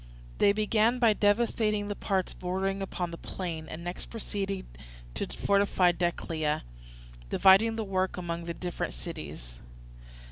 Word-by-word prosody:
They 200 - +6
began 215 +3 +2
by 230 -3 +5
devastating 210 0 +2
the 205 - -3
parts 190 -3 -1
bordering 190 +2 -2
upon 180 -2 -3
the 170 - -7
plain, 165 -4 -5
and 165 +2 -7
next 175 +1 -5
proceeded 200 -3 -3 0.5
to - - -2
fortify 200 -3 +3
Decelea, 165 -3 -1 0.7
dividing 195 - +6
the 225 - -2
work 190 -2 -1
among 170 -1 -4
the 170 0 -4
different 175 - -4
cities. - - -8
190 Hz, 135 wpm, -29 LUFS, 170-205 Hz, 0.7 s, They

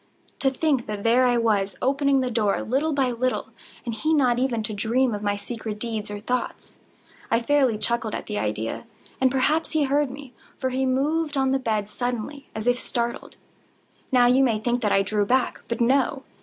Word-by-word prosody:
To 270 - +3
think 270 -2 0
that 210 -1 -4
there 245 +3 +4
I 245 -1 +3
was, 205 -4 +1
opening 275 +1 +2
the 255 -1 -1
door, 215 -3 +1
little 275 +7 0
by 270 -3 +1
little, 255 +2 -1 0.4
and 235 - -3
he 310 +8 +1
not 250 -4 +3
even 245 -4 0
to 215 0 -3
dream 235 +4 +1
of 205 - -4
my 205 -1 0
secret 220 0 -6
deeds 220 -2 -3
or 205 0 -5
thoughts. 250 +4 -4 0.5
I 230 - +3
fairly 260 -2 +2
chuckled 230 0 -1
at - - -5
the 210 -1 -3
idea; 110 - -3 0.4
and 260 - +5
perhaps 295 +6 +1
he 310 -2 +3
heard 285 +1 +1
me; 270 -1 -10 0.2
for 260 -1 -2
he 260 +1 0
moved 295 +3 0
on 265 -1 +2
the 270 - +2
bed 215 -5 -1
suddenly, 245 +5 -4
as 215 0 -4
if 245 0 +2
startled. 235 0 -3 0.8
Now 250 -2 +5
you 255 +2 +5
may 230 -4 +2
think 240 +3 -1
that 210 -3 +1
I 195 - +4
drew 205 +1 0
back—but 245 +1 -1
no. 265 +2 +2
245 Hz, 195 wpm, -24 LUFS, 220-270 Hz, 0.8 s, and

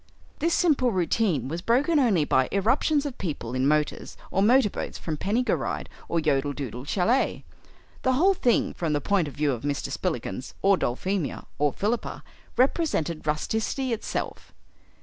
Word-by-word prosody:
This 335 +2 +2
simple 285 -8 +3
routine 180 - +1
was 165 +5 -4
broken 280 - +3
only 200 - +3
by 130 -2 +2
irruptions 280 - +2
of 280 -4 -5
people 145 -10 -4
in 130 +1 +1
motors 150 0 0
or 195 - +1
motor 235 0 +5
boats - - -5
from 160 - -4
Penny 210 +10 0
gw - - +2
rydd - - -3 0.2
or 170 - +1
Yodel 145 -2 +1
Dudel 125 -3 -6
Chalet. 225 - +1 0.6
The 260 - +2
whole 365 +9 +4
thing, 245 -10 +1
from 165 -3 -2
the 145 - +2
point 185 +1 +1
of 145 - -8
view 150 -1 +1
of 120 -3 -3
Mr. 145 0 -2
Spillikins 125 - -3
or 195 0 +6
Dulphemia 180 +4 -2
or 145 -1 +3
Philippa, 215 - -2 0.3
represented 245 - +1
rusticity 220 - -1
itself. 225 - -5
185 Hz, 165 wpm, -26 LUFS, 145-245 Hz, 0.6 s, or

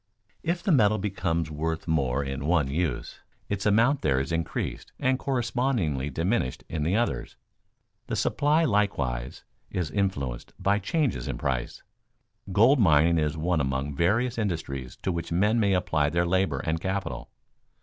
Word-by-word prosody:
If 170 +1 -2
the 195 - +1
metal 110 -7 +4
becomes 85 -5 -1
worth 80 +2 -3
more 70 -4 +1
in 70 +1 -4
one 80 -5 +3
use, 75 -1 -2 0.3
its 100 0 -1
amount 115 +7 +3
there 65 -1 +2
is 70 +5 -3
increased 85 0 -3
and 130 0 +1
correspondingly 120 - 0
diminished 80 - -1
in 80 - -3
the 85 +6 +1
others. 120 +1 -1 0.7
The - - -2
supply 150 +3 +2
likewise 70 - -1 0.3
is 85 -5 -2
influenced 70 -12 -2
by 100 +2 +2
changes 120 - -1
in - - -3
price. 65 -3 -3 0.7
Gold 115 +9 +5
mining 80 -3 +5
is 75 0 -1
one 85 0 +1
among 65 +1 -1
various 110 - +1
industries 70 - -3
to 95 - 0
which 85 -1 -4
men 105 +7 +2
may 100 -3 +3
apply 80 -5 +1
their 85 +2 +1
labor 95 -4 +1
and 80 +1 -2
capital. 95 -10 -3
85 Hz, 150 wpm, -27 LUFS, 75-105 Hz, 0.7 s, Gold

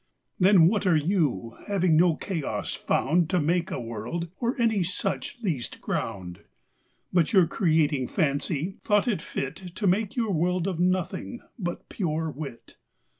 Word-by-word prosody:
Then 185 -3 +7
what 205 +1 +1
are 175 - +5
You, 145 - 0
having 185 -5 +2
no 170 0 +5
Chaos 165 -6 -3
found 160 +3 +1
To 180 - +2
make 170 +4 +1
a 185 - -3
World, 120 +9 -5
or 240 +2 -1
any 225 -4 +2
such 185 +8 -2
least 155 - -2
ground? 90 -2 -4 0.7
But 175 +1 +2
your 190 -4 +6
Creating 155 - +1
Fancy, 155 +3 -1
thought 210 +3 +2
it 210 -9 0
fit 135 -4 -4 0.2
To 205 - -3
make 195 +2 +1
your 225 -4 0
World 175 +2 +1
of 180 -4 -2
Nothing, 185 +6 -1 0.2
but 175 -3 -4
pure 160 -4 -2
Wit. 140 -4 -9
175 Hz, 150 wpm, -26 LUFS, 155-195 Hz, 0.7 s, Then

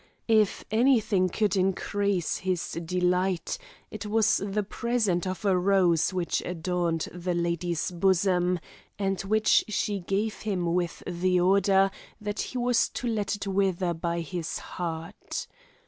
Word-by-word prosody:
If 215 -3 +3
any 245 +3 +5
thing 195 -4 +1
could 205 +1 +1
increase 195 -1 0
his 185 -2 -2
delight, 180 +1 0 0.3
it 215 0 -6
was 215 0 +3
the 205 +1 -1
present 210 -4 0
of 185 +3 -4
a 195 -2 +4
rose 180 -3 +3
which 180 -2 -1
adorned 175 -1 -1
the 180 0 -2
lady's 170 0 -1
bosom, 180 0 +2 0.4
and 195 -2 -1
which 215 +2 +3
she 205 -1 -1
gave 200 +4 -2
him 180 -5 -1
with 175 -1 -1
the 180 +1 +1
order 195 +1 +4 0.3
that 210 0 -4
he 255 - -3
was 245 -1 +2
to - - -5
let 215 -2 0
it 205 - -6
wither 190 -2 +1
by 170 +1 -2
his 165 0 -4
heart. 170 +2 -5
185 Hz, 140 wpm, -27 LUFS, 175-205 Hz, 0.4 s, any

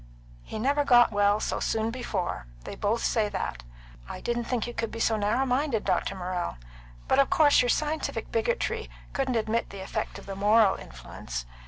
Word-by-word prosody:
"He 220 - -7
never 280 +6 +2
got 240 -4 +6
well 205 0 +3
so - - -2
soon 225 0 0
before. 200 - -3 0.2
They - - -7
both 215 +3 -1
say 215 -3 +1
that. 185 - -4 0.5
I - - -6
didn't 240 0 -2
think 240 -2 -1
you 240 - -6
could 230 -2 -2
be 230 - -7
so 225 0 +2
narrow 215 +5 +1
minded, 255 -2 0
Dr. 195 - 0
Morrell. 180 - -3 0.5
But - - +3
of 275 - +4
course 295 -2 +5
your 245 - 0
scientific 310 +3 -1
bigotry 480 +1 -1 0.2
couldn't 265 -3 0
admit 225 +1 0
the 195 -1 -8
effect - - -4
of - - -11
the 195 - -6
moral 205 0 +5
influence. - - -7
225 Hz, 185 wpm, -27 LUFS, 200-250 Hz, 0.5 s, got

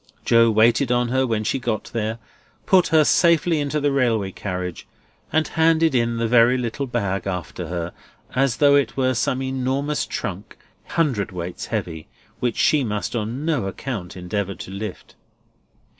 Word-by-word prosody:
Joe 115 0 +5
waited 115 +4 +3
on 120 -1 +1
her 130 +1 +1
when 110 -2 -1
she 135 - -1
got 115 -4 -3
there, 110 -1 -2 0.5
put 190 -4 +4
her 160 -1 +5
safely 170 0 +3
into 145 +1 -1
the 145 -1 +1
railway 115 -8 +1
carriage, 90 -3 -5 0.4
and 160 -1 +2
handed 160 -1 +3
in 115 -2 +1
the 115 0 0
very 120 +2 +5
little 125 +3 -3
bag 100 -6 -2
after 90 -2 -4
her, 85 0 -4 0.4
as 130 -1 +1
though 145 -1 +5
it 140 -4 +2
were 130 -1 +2
some 130 +2 -1
enormous 135 +3 -1
trunk, 100 +2 -5 0.4
hundredweights 100 - -2
heavy, 80 -2 -4 0.3
which 120 -2 -1
she 150 -3 +3
must 105 0 -3
on 120 +6 -3
no 150 -11 0
account 95 -4 -5
endeavour 100 +2 -3
to - - -9
lift. 100 0 -7
120 Hz, 160 wpm, -22 LUFS, 100-140 Hz, 0.5 s, Joe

